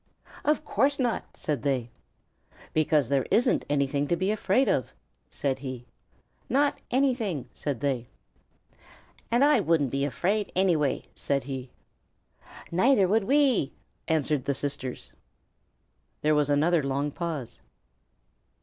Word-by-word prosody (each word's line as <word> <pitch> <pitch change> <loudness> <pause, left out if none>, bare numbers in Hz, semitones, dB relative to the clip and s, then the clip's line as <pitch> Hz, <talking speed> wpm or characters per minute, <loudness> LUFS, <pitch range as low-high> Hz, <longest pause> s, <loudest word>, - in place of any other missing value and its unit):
"Of 300 +1 +1
course 275 +6 +2
not," 245 -4 -2
said 150 -3 -2
they. 130 -5 -1 0.8
"Because 155 -3 +2
there 140 -2 +1
isn't 245 +2 +3
anything 140 0 +1
to 175 - +2
be 185 +3 0
afraid 215 +4 +2
of," 130 - 0 0.4
said 135 -2 -2
he. 130 -3 -6 0.6
"Not 285 +3 +2
anything," 240 - 0
said 140 -5 -4
they. 130 -4 -1 1.2
"And 240 +3 +3
I 295 -4 +5
wouldn't 165 - +1
be 140 0 0
afraid 195 +9 -1
anyway," 165 -8 +2
said 140 -1 -1
he. 130 -1 -6 1.0
"Neither 195 +3 +4
would 210 +2 +2
we," 270 - +3 0.3
answered 150 -4 0
the 140 - 0
sisters. 140 -2 -4 1.1
There 155 0 +4
was 150 -1 +2
another 155 +4 +3
long 140 +1 -1
pause. 145 -8 -5
150 Hz, 120 wpm, -27 LUFS, 140-215 Hz, 1.2 s, I